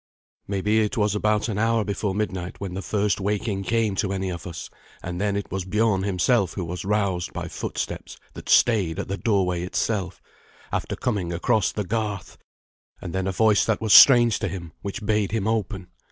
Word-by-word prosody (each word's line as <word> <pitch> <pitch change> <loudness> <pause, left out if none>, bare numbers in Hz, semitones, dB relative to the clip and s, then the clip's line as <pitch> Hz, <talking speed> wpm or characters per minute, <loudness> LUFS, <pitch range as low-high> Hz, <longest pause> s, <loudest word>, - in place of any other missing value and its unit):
Maybe 100 +2 +1
it 110 +4 0
was 105 -1 +2
about 105 +1 +1
an 105 -3 -2
hour 115 0 +2
before 100 -1 -2
midnight 95 -4 -3
when 95 -2 -5
the 95 - -4
first 100 +1 0
waking 100 0 -1
came 115 -1 +1
to 95 - 0
any 95 -1 -2
of 85 -1 -7
us, 85 -2 -7 0.4
and 90 +2 -4
then 100 -1 0
it 100 - -4
was 95 -1 -2
Biorn 105 +1 +1
himself 100 +1 +1
who 95 - -4
was 90 +1 -5
roused 95 -4 -1
by - - -4
footsteps - - -5 0.2
that - - -10
stayed 100 -9 +3
at - - -4
the 100 - -2
doorway 95 -6 +1
itself, 95 0 -2 0.5
after - - -2
coming 100 -8 -2
across 105 +4 +1
the 105 - -3
garth, 105 -1 -4 0.6
and 85 - -7
then 95 0 -1
a - - 0
voice 105 +1 +3
that 110 - 0
was 110 -2 +2
strange 120 -5 +8
to - - -1
him 85 -4 -6
which 100 +2 -5
bade 105 0 0
him 110 -2 0
open. 105 -4 -2
100 Hz, 195 wpm, -24 LUFS, 95-110 Hz, 0.6 s, strange